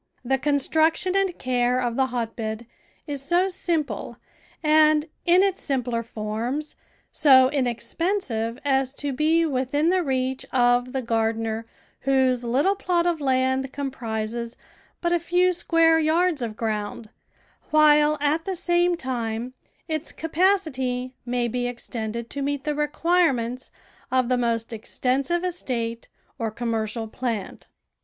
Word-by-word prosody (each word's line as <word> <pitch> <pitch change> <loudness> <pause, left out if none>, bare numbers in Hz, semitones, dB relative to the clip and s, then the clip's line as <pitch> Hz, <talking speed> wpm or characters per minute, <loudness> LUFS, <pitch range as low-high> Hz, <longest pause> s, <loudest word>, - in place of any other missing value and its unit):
The 265 +2 +1
construction 315 +6 +1
and 390 -3 +1
care 250 0 +1
of 240 -2 -1
the 265 0 +2
hotbed 230 -2 -4 0.4
is 285 -3 -3
so 345 +6 +2
simple 300 - -2 0.5
and, 305 0 +4 0.2
in 360 +2 +6
its 390 -1 0
simpler 250 -4 -1
forms, 230 +7 -4 0.4
so 260 -3 +6
inexpensive 250 - -1
as 270 -1 +1
to 285 -1 -3
be 320 +4 +2
within 290 +3 +1
the 370 0 +2
reach 260 -3 -1
of 245 0 +2
the 265 -1 -2
gar 225 -1 +1
dener 225 0 -3 0.3
whose 260 -2 +2
little 270 +11 +2
plot 355 -3 0
of 340 -3 0
land 260 0 +1
comprises 235 -4 -4 0.4
but 345 0 +1
a 345 - +3
few 360 +2 +2
square 330 -2 +3
yards 320 0 +2
of 225 -2 -4
ground, 215 0 -3 0.6
while 305 -1 +5
at 295 +3 0
the 385 -1 -2
same 350 0 +2
time 240 -3 -3 0.3
its 315 -1 -3
capacity 300 -8 0
may 245 0 0
be 245 +1 -2
extended 235 -1 -4
to 280 - -4
meet 285 0 -2
the 300 -1 -1
requirements 295 -5 +1 0.4
of 255 -1 +1
the 250 - +2
most 230 -1 -1
extensive 265 +9 -1
estate 240 -10 -3 0.3
or 225 - -1
commercial 225 0 -3
plant. 225 -3 -4
265 Hz, 135 wpm, -24 LUFS, 235-315 Hz, 0.6 s, in